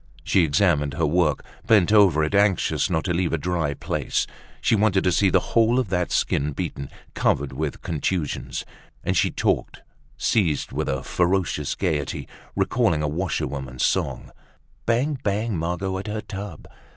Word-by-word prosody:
She 90 - +3
examined 70 -1 +2
her 80 - +1
work, 80 -2 +1 0.2
bent 105 -5 +5
over 95 -8 +5
it, 80 - -1
anxious 100 -2 +2
not 80 - 0
to 90 - -1
leave 85 -1 0
a - - +2
dry 80 -2 -1
place. - - -1 0.3
She - - +2
wanted 100 -2 +2
to 90 - +3
see 100 +2 +3
the - - +1
whole 115 +1 +4
of 125 -7 0
that 90 -1 0
skin 75 +1 +1
beaten, 70 0 -4 0.2
covered 70 -1 0
with 75 +1 -4
contusions. 80 0 -2 0.4
And - - 0
she - - +3
talked, - - -1 0.3
seized 85 -10 +1
with - - -2
a 65 -1 -2
ferocious 90 -5 0
gaiety, 75 -7 -2 0.3
recalling 75 -2 +1
a - - +1
washerwoman's 70 -6 -2
song, - - -1 0.6
"Bang! 130 +5 +1
Bang! 105 +1 -1
Margot 90 +3 -2
at 100 - -7
her 105 +1 -3
tub. 100 -6 -8
90 Hz, 160 wpm, -24 LUFS, 75-100 Hz, 0.6 s, bent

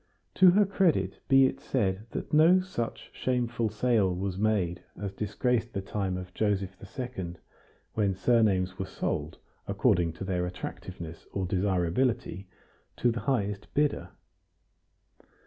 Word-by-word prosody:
To 185 -1 +7
her 200 +3 +5
credit 165 - +1
be 135 0 +6
it 135 +1 -1
said 105 -6 -1
that - - -6
no 165 +5 +7
such 180 -11 -4
shameful 120 -3 0
sale 105 -3 +2
was 95 0 -2
made 100 -4 0 0.2
as 100 -2 -3
disgraced 115 +3 -1
the 100 - -2
time 95 -1 -2
of 90 0 -8
Joseph 100 -3 0 0.2
II., 95 -9 -4 0.6
when 100 -3 +1
surnames 95 -5 +2
were 95 - -2
sold, - - -3 0.3
according 85 -2 +2
to 90 - -7
their 90 -2 -1
attractiveness 90 -2 -7
or 95 -1 -1
desirability, 95 +2 0 0.5
to 120 - +3
the 115 - -3
highest 105 -7 -1
bidder. 145 0 +1
100 Hz, 130 wpm, -29 LUFS, 95-125 Hz, 0.6 s, To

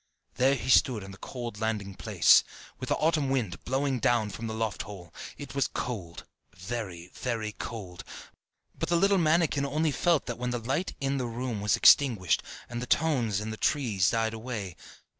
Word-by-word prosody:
There 130 +2 +3
he 130 - -6
stood 120 -4 +4
on 95 - -9
the 95 - -13
cold 120 -4 -6
landing 105 -3 -2
place, - - +5 0.4
with - - -5
the - - +3
autumn 155 -3 +1
wind 120 -9 -1
blowing 135 0 0
down 115 -2 +2
from 115 +4 -6
the 110 - -4
loft 110 -2 -2
hole: 90 -5 -10 0.2
it 145 -2 -8
was 140 -1 +1
cold, 95 -9 -5 0.3
very 90 -3 -6 0.5
cold; 95 -6 -7 0.7
but - - -3
the 170 - +3
little 195 +2 +4
mannikin 160 -3 +2
only 150 +3 0
felt 170 +1 +2
that 120 -1 -5
when 125 0 -2
the 120 - -1
light 135 +10 -2
in 140 0 0
the 125 -2 -2
room 120 -2 -4
was 105 -2 +3
extinguished, 115 - +5 0.3
and 120 0 -5
the 125 - -5
tones 120 -10 +1
in 110 +1 -4
the 110 - -6
tree 115 -10 0
died 115 -1 0
away. 110 -6 -5
120 Hz, 180 wpm, -28 LUFS, 105-140 Hz, 0.7 s, place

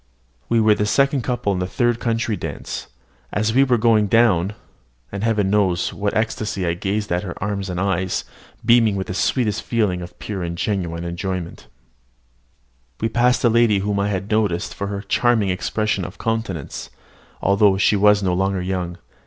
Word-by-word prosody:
We 115 - +3
were 110 -1 +5
the 105 0 -1
second 140 +4 +2
couple 120 -4 -1
in 90 - -2
the 90 - -1
third 120 +3 0
country 115 -2 -1
dance. - - -6 0.4
As 110 +1 0
we 135 +3 +5
were 125 -3 +2
going 110 -2 +3
down 100 -3 +3 0.6
(and 100 +1 -4
Heaven 105 -4 +1
knows 95 -4 +1
with - - -12
what 100 0 0
ecstasy 110 -3 -1
I 85 - +1
gazed 100 +3 -2
at 90 0 +1
her 90 -4 -6
arms 100 -1 -3
and 90 0 -3
eyes, 95 -1 0 0.4
beaming 115 -3 +5
with 95 -1 -2
the - - -5
sweetest 110 +2 0
feeling 105 -6 0
of 85 - -10
pure 100 -3 -5
and 85 0 -4
genuine 85 -4 -2
enjoyment), 85 0 -5 1.3
we 115 - 0
passed 125 +2 +2
a - - +6
lady 115 -2 +4
whom 100 +1 -1
I 100 - +1
had 100 +1 -3
noticed 105 -4 0
for 100 - -4
her 100 0 -4
charming 110 0 +2
expression 100 +1 -1
of 90 - -8
countenance; 110 -10 -3 0.5
although 100 0 +3
she 100 +2 +3
was 105 0 +4
no 90 -2 +1
longer 95 +1 0
young. 90 -2 -3
100 Hz, 180 wpm, -21 LUFS, 95-110 Hz, 1.3 s, a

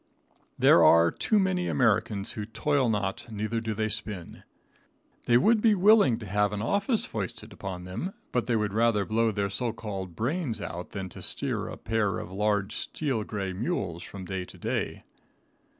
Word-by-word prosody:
There - - +6
are 85 0 +6
too 215 - +1
many 185 -2 +1
Americans 110 -4 +1
who 105 -1 -5
toil 130 +3 +1
not, 100 0 -2
neither 110 +2 -2
do 110 -1 -3
they 110 +1 0
spin. 105 -5 -4 0.8
They 120 - +5
would 220 - +4
be 220 -2 +5
willing 200 - +5
to 110 - -8
have 105 +1 +1
an 105 - -3
office 200 - +1
foisted 110 +1 -5
upon 95 -3 -6
them, 95 - -5 0.2
but 125 - 0
they 120 - +2
would 105 -2 0
rather 110 -2 +2
blow 115 +2 +2
their 100 -2 -1
so 115 +3 -1
called 95 -5 -6
brains 130 -1 -2
out 90 -3 -6
than 95 -2 -5
to - - -10
steer - - 0
a - - -7
pair 105 -3 0
of - - -7
large 105 0 0
steel 135 -8 -2
gray 100 -3 -4
mules 95 - -2
from 95 +1 -8
day 95 0 -3
to - - -13
day. - - -3
110 Hz, 180 wpm, -28 LUFS, 100-120 Hz, 0.8 s, There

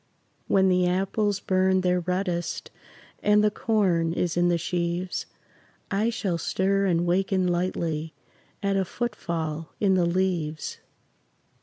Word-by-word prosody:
When 190 -1 +4
the 180 -1 +3
apples 195 +2 0
burn 190 -1 +2
their 180 0 +2
reddest 180 0 -2 0.5
And 210 0 +4
the 210 - +3
corn 185 -7 +1
is 175 -1 -1
in 175 0 +3
the 175 - +2
sheaves, 175 +2 -2 0.6
I 205 +3 +2
shall 195 -7 -2
stir 195 +4 +1
and 175 -1 +2
waken 185 +1 +1
lightly 170 -3 -1 0.5
At 200 0 +1
a 190 - +2
footfall 165 -8 -3
in 200 -2 +3
the 180 -2 +3
leaves. 170 -4 -1
180 Hz, 130 wpm, -26 LUFS, 170-195 Hz, 0.6 s, When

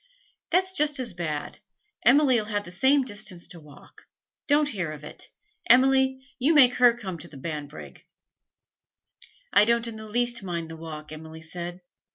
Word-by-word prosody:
'That's 375 +2 +1
just 300 -3 +2
as 240 -6 -3
bad. 155 -4 -4 0.4
Emily 260 -2 +5
'll - - -8
have 205 -1 -2
the 175 - -10
same 265 +9 +3
distance 205 -7 -6
to 175 - -10
walk. 150 -2 -17 0.4
Don't 295 0 +3
hear 185 - -3
of 150 -1 -9
it, 150 - -10 0.4
Emily; 265 +1 +5 0.2
you 295 +6 +3
make 255 -4 +7
her 245 -1 +5
come 190 -7 -6
to - - -6
Banbrigg!' 150 +1 -8 1.5
'I 205 - +6
don't 235 +1 +1
in 225 -1 -7
the 220 0 -9
least 240 +1 0
mind 170 -4 -4
the - - -7
walk,' 155 -2 -9
Emily 160 +1 -10
said. 175 +2 -7
210 Hz, 165 wpm, -26 LUFS, 165-260 Hz, 1.5 s, make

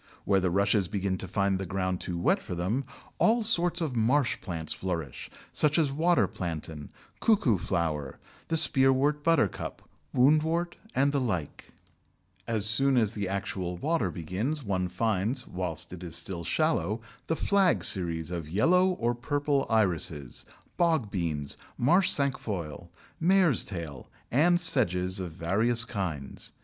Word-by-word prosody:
Where 95 - +3
the 95 -1 0
Rushes 100 +1 +2
begin 95 -2 -2
to 95 - -5
find 100 0 0
the 95 - -4
ground 95 0 -2
too 90 - -4
wet 85 - +1
for 90 - -6
them, 105 +11 -2 0.3
all 230 +1 +3
sorts 175 -5 +1
of 150 -6 -2
marsh 120 +4 +1
plants 80 -5 -4
flourish, 85 -8 -5 0.2
such 150 +1 +2
as 155 -4 +2
Water 165 +5 +2
Plantain, 80 -4 -6 0.3
Cuckoo 140 - +2
flower, 80 -7 -2 0.3
the 165 - +2
Spearwort 140 0 +4
Buttercup, 165 - 0 0.3
Woundwort, 160 +6 +2 0.2
and 140 +2 +3
the 140 -1 0
like. 90 - -4 0.7
As 110 -3 0
soon 135 +5 +4
as 110 -2 +2
the 100 -4 -3
actual 95 -2 -3
water 145 - 0
begins, 95 - -4
one 95 -4 -1
finds, 110 +6 -1
whilst 90 -2 -3
it 90 - -9
is 85 -2 -4
still 85 0 -1
shallow, 115 - 0 0.3
the 160 - 0
Flag 195 +1 +2
series 85 -3 +1
of 85 -4 -5
yellow 175 - +3
or 120 -10 -1
purple 140 +3 -1
Irises, 85 - +1 0.3
Bogbeans, 95 - 0 0.2
Marsh 180 +9 +3
Cinquefoil, 100 - -1 0.3
Mare's 175 - +3
Tail, 80 - -7 0.2
and 175 +7 +3
Sedges 95 - +2
of 90 -3 -5
various 110 +8 +2
kinds. 85 - -5
105 Hz, 140 wpm, -28 LUFS, 90-145 Hz, 0.7 s, Spearwort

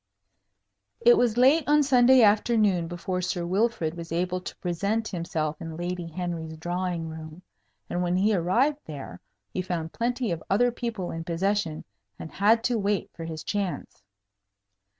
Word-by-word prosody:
It 240 - +7
was 240 -2 +2
late 275 +6 +5
on 295 0 +5
Sunday 255 -2 +6
afternoon 210 -4 +3
before 180 +2 -3
Sir 175 -1 -2
Wilfrid 190 -3 0
was 170 -1 -8
able 180 +2 -1
to - - -8
present 200 +6 -1
himself 160 -4 -3
in 165 -1 -6
Lady 175 0 -3
Henry's 165 -2 -5
drawing 175 0 -2
room; 160 +2 -9 0.4
and 175 - -2
when 175 0 0
he 205 +4 +3
arrived 230 - +2
there, 135 - -8 0.3
he - - -1
found 170 -3 -4
plenty 240 -1 -1
of 165 -2 -3
other 245 +5 +3
people 230 -6 -4
in 165 0 -5
possession, 175 -1 -1 0.3
and 160 - -8
had 225 +3 +3
to 240 -2 +1
wait 200 -1 -1
for 165 - -7
his 160 -1 -6
chance. 200 -3 -3
180 Hz, 155 wpm, -26 LUFS, 165-225 Hz, 0.4 s, It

